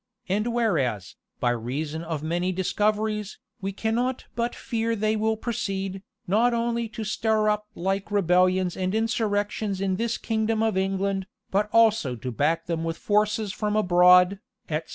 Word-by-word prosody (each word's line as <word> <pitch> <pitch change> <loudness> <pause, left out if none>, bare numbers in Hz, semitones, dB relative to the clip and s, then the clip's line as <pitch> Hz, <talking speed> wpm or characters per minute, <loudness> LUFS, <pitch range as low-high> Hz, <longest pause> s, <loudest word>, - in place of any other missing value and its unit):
And 210 +5 0
whereas, 135 - 0 0.2
by 120 - +2
reason 140 +7 -3
of 160 -3 -4
many 175 +3 0
discoveries, 210 +3 -1 0.2
we 195 +1 -2
cannot 235 +5 -1
but 235 +1 -2
fear 230 -2 -2
they 215 0 +1
will 220 +1 0
proceed, 195 -4 -3 0.2
not 230 +6 +3
only 235 -1 -1
to 220 - -6
stir 215 0 +1
up 210 0 -1
the - - -10
like 195 +2 -1
rebellions 185 -2 +2
and 185 +2 -1
insurrections 210 -2 -1
in 190 -1 0
this 230 +1 -1
kingdom 220 0 0
of 220 -2 +1
England, 195 0 -1 0.2
but 205 +2 +1
also 220 - +3
to 125 +2 -5
back 160 +7 0
them 165 -1 -2
with 165 0 -3
forces 210 0 +1
from 210 -1 -1
abroad," 180 -1 +5 0.3
etc. 160 +1 -2
200 Hz, 155 wpm, -25 LUFS, 180-220 Hz, 0.3 s, abroad